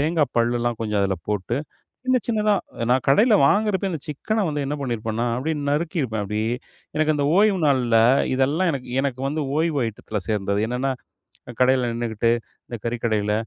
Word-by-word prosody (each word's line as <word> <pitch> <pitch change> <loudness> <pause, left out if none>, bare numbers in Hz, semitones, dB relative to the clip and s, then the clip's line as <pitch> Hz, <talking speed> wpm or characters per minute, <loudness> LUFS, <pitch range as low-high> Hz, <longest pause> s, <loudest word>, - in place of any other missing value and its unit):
தேங்காப் 155 0 +1
பல்லுலாம் 120 0 0
கொஞ்சம் 105 -2 0
அதுல 95 -1 0
போட்டு, 105 +2 -1 0.5
சின்ன, 255 0 +3
சின்னதா. 215 -2 +2 0.4
நான் 130 +1 +2
கடைல 215 - +5
வாங்குறப்பயே, 200 +2 +1
அந்த 160 - -4
சிக்கன 210 +9 -1
வந்து 150 -1 -2
என்ன 145 - -2
பண்ணி 130 -4 -1
இருப்பேன்னா, 110 +2 -2
அப்பிடியே 155 +5 -2
நறுக்கியிருப்பேன். 145 - -1
அப்பிடியே, 110 +3 -1 0.4
எனக்கு 155 0 +2
அந்த 145 - 0
ஓய்வு 205 -2 +4
நாள்ல 125 -5 +3 0.4
இதெல்லாம் 145 +8 +2
எனக் 135 -3 -5
எனக்கு 130 -2 -2
வந்து 155 +2 -2
ஓய்வு 160 -2 +1
ஐட்டத்துல 110 -1 -5
சேர்ந்தது. 100 -1 0
என்னனா, 125 +3 -1 0.7
கடைல 130 -1 +3
நின்னுகிட்டு, 115 -1 0 0.4
இந்தக் 120 -3 -8
கறி 115 +1 -1
கடையில. 105 -2 +1
130 Hz, 160 wpm, -23 LUFS, 115-155 Hz, 0.7 s, கடைல